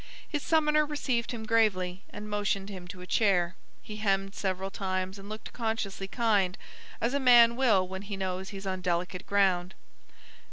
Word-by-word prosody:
His 295 -3 -2
summoner 305 -1 +3
received 275 -6 -1
him 225 -2 -5
gravely, 195 -6 +1
and 210 0 -8
motioned 205 -1 -1
him 185 -3 -8
to 180 0 -9
a - - -8
chair. 180 -4 +2 0.3
He 210 -2 -7
hemmed 195 -2 0
several 190 -1 -2
times 190 0 -3
and 195 +1 -10
looked 215 0 -8
consciously 220 -4 -2
kind, 205 -4 +1 0.4
as 235 +3 0
a 280 - +1
man 240 -3 +7
will 220 -8 +3
when 190 +1 -6
he 200 0 -6
knows 190 0 -3
he's 195 -1 -8
on 185 -1 -2
delicate 180 +1 -2
ground. 190 -2 +2
195 Hz, 170 wpm, -29 LUFS, 185-225 Hz, 0.4 s, man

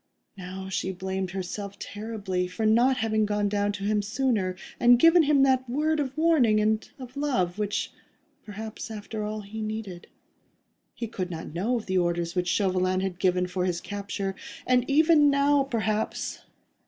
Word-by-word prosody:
Now 190 0 -7
she 190 0 -2
blamed 190 0 -3
herself 195 +2 -5
terribly 205 -5 -3
for 220 +5 -3
not 240 +4 +4
having 220 -2 +1
gone 205 0 0
down 205 0 0
to 200 -1 -6
him 210 0 +1
sooner, 210 -4 0 0.2
and 245 0 +7
given 330 +6 +6
him 290 -3 +4
that 260 -2 +2
word 305 +4 +1
of 280 0 -3
warning 300 -10 +4
and 215 +1 0
of 255 -1 -10
love 215 -11 -1
which, 205 -1 -1 0.5
perhaps, 220 +2 -7
after 215 0 -6
all, 215 0 -4
he 215 +2 -7
needed. 215 -5 -5 0.9
He 235 - -4
could 190 -5 -4
not 160 -3 -7
know 215 +9 0
of 225 - -6
the 185 -1 +1
orders 175 -1 -1
which 180 -1 -1
Chauvelin 185 -1 +1
had 190 -2 -3
given 180 -1 +2
for 180 0 -2
his 175 -2 -1
capture, 200 -1 -4 0.3
and 250 0 +2
even 305 0 +5
now, 280 0 +3
perhaps 220 -4 -2
210 Hz, 165 wpm, -27 LUFS, 190-245 Hz, 0.9 s, and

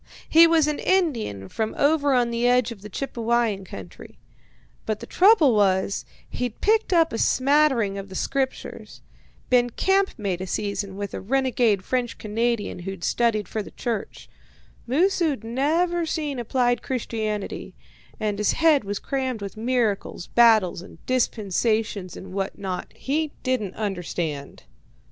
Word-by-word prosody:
He 330 +1 +7
was 330 -2 +4
an 300 -1 -1
Indian 235 - 0
from 220 - -3
over 285 -1 +3
on 240 -1 +2
the 235 +1 +1
edge 250 -1 +3
of 215 -4 -9
the 210 - -9
Chippewyan 230 -3 -1
country, 95 - -11 0.7
but 215 -1 -1
the - - -8
trouble 360 - +5
was, 195 -2 +1 0.2
he'd 245 -3 -4
picked 440 0 +2
up 330 -2 +3
a 225 - -2
smattering 260 -7 +2
of 195 0 -8
the 190 - -9
Scriptures. 270 +5 -3 0.5
Been 245 -1 +4
campmate 230 - 0
a 190 - -4
season 200 0 -3
with 200 0 -5
a - - -5
renegade 240 -3 +1
French 245 -2 -1
Canadian 225 -2 -1
who'd 190 0 -7
studied 220 -5 +1
for 215 - -3
the - - -9
church. 230 -5 -5 0.6
Moosu'd 320 - +1
never 325 +8 0
seen 295 -5 -2
applied 245 +1 +1
Christianity, 220 - -4 0.4
and 210 -1 -2
his 210 - +2
head 315 -5 +4
was 205 0 -3
crammed 260 -2 -2
with 200 - -6
miracles, 225 -6 -1
battles, 220 -7 +4
and 185 - -13
dispensations, 215 -4 0
and 185 -1 -10
what 195 0 -3
not 190 -2 -5
he 300 +2 -2
didn't 250 -8 -1
understand. 175 -8 -4
235 Hz, 145 wpm, -24 LUFS, 200-275 Hz, 0.7 s, He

